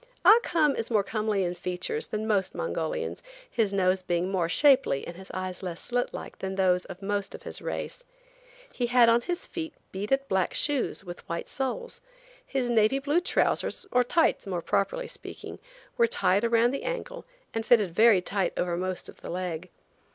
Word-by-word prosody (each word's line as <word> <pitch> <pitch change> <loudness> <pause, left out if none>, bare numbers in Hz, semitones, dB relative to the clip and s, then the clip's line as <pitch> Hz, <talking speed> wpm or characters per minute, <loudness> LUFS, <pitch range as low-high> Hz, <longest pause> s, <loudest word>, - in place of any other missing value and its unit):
Ah 445 - +9
Cum 310 -9 +2
is 225 - -3
more 215 -4 +3
comely 215 -2 0
in 175 -1 -1
features 180 - -3
than 215 0 -3
most 200 -4 0
Mongolians, 485 0 -3 0.3
his 225 - 0
nose 190 -1 +2
being 180 +1 -1
more 175 -4 0
shapely 270 - +4
and 170 - -7
his 190 +1 -11
eyes 185 -1 -4
less 175 -3 -5
slit 245 0 -1
like - - -8
than 190 0 -3
those 185 -1 +2
of 190 +1 -10
most 200 0 -2
of - - -12
his - - -6
race. - - -5 0.7
He 245 - -1
had 240 -1 +6
on 230 +1 +4
his 350 +6 -3
feet 325 -2 -6 0.2
beaded 270 +8 -1
black 190 -5 0
shoes 290 -8 +1
with 175 -2 -10
white 170 0 -3
soles. 475 - -4 0.4
His 265 - -1
navy 230 +2 +3
blue 290 +4 +1
trousers, 360 +2 0
or 250 - +4
tights, 320 -2 +2
more 180 -3 -3
properly - - 0
speaking, - - -9 0.4
were 470 -1 +5
tied 205 - +2
around 235 +1 +3
the 275 - -3
ankle - - -5 0.3
and 225 - -1
fitted 215 -6 +4
very 215 -2 +5
tight 195 -1 -1
over 175 -1 0
most 185 +1 -3
of - - -13
the - - -8
leg. 180 -1 -4
215 Hz, 185 wpm, -28 LUFS, 185-275 Hz, 0.7 s, Ah